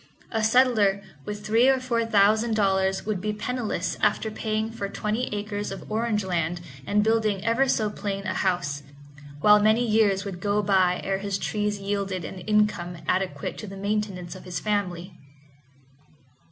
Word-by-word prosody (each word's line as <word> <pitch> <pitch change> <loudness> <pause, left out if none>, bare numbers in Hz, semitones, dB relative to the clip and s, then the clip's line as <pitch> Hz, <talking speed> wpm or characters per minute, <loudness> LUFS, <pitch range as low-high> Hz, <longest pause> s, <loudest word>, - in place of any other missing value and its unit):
A 225 -1 0
settler 220 -4 +3 0.2
with 210 0 -6
three 230 +4 +4
or 265 -1 +3
four 235 -3 -1
thousand 220 +2 +3
dollars 190 -2 +1
would 205 -4 -2
be 210 +1 -1
penniless 235 +2 -3
after 220 - +1
paying 220 0 -2
for 200 -3 -4
twenty 215 +4 -2
acres 205 0 -3
of 195 - -8
orange 220 -1 0
land 175 -2 -1 0.3
and 210 +1 +3
building 215 -3 +1
ever 230 +4 +3
so 220 -4 +1
plain 200 -1 -4
a - - -1
house, 170 -7 -1 0.6
while 210 +2 +7
many 220 +3 +4
years 210 -3 +2
would 190 -3 -5
go 205 +1 +1
by 185 -2 +3
ere 195 0 -1
his 200 -1 -2
trees 210 +2 -1
yielded 195 -2 -2
an 190 - -7
income 210 -3 +1
adequate 180 -7 -1
to 215 - -7
the 195 0 -8
maintenance 200 -3 -2
of 185 - -11
his 180 -3 -4
family. 185 -4 -2
205 Hz, 165 wpm, -25 LUFS, 190-220 Hz, 0.6 s, while